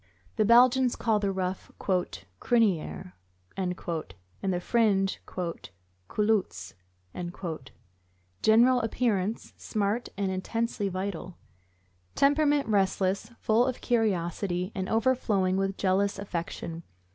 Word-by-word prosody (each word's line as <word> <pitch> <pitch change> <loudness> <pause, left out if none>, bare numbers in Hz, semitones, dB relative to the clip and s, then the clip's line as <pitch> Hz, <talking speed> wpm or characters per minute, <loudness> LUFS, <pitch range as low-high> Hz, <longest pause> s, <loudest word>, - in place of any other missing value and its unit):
The 215 - +2
Belgians 250 +2 +5
call 220 -3 +1
the 200 -1 0
ruff 185 -1 -3
"criniere 180 - -1 0.2
" 90 0 -37
and 185 -2 -1
the 160 - -5
fringe 195 -2 +1
"culottes." 95 - -3 1.7
General 245 +3 +5
appearance 225 -3 -1
smart 215 +2 -1
and 195 -1 0
intensely 205 +2 -2
vital. 185 -1 -5 0.8
Temperament 290 -1 +3
restless, 195 0 +1
full 230 +3 +2
of 255 - -3
curiosity, 185 -4 0
and 190 -3 -3
overflowing 220 -5 +2
with 195 0 -1
jealous 200 +1 +1
affection. 170 -3 -5
195 Hz, 95 wpm, -28 LUFS, 180-225 Hz, 1.7 s, Belgians